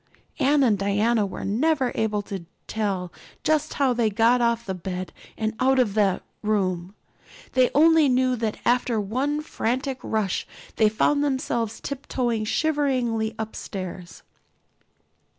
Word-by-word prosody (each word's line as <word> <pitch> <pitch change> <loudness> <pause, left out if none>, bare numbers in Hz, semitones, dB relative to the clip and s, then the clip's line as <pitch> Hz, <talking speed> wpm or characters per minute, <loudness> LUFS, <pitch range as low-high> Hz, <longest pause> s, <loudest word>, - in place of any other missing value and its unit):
Anne 285 +1 +4
and 215 -6 +3
Diana 205 +2 +2
were - - -6
never 260 +5 +1
able 210 -2 -1
to 190 -4 -7 0.2
tell 195 -5 -2 0.3
just 310 0 +1
how 270 -3 +2
they 235 -2 +1
got 230 +4 +3
off 235 0 +1
that 190 -2 -5
bed 180 -1 -5 0.2
and 220 0 -1
out 265 +1 +3
of 240 -6 +2
the 200 -3 +2 0.2
room. 190 -3 -1 0.6
They 255 -1 +4
only 320 -1 +6
knew 255 0 +2
that 220 -2 -2
after 240 -2 +2
one 260 +9 -1
frantic 260 -1 -2
rush 215 -4 -1 0.3
they 215 -1 +5
found 285 +7 +2
themselves 240 -5 -1
tiptoeing 250 -5 -2
shiveringly 250 -6 0
upstairs. 185 -5 -6
230 Hz, 135 wpm, -24 LUFS, 205-260 Hz, 0.6 s, only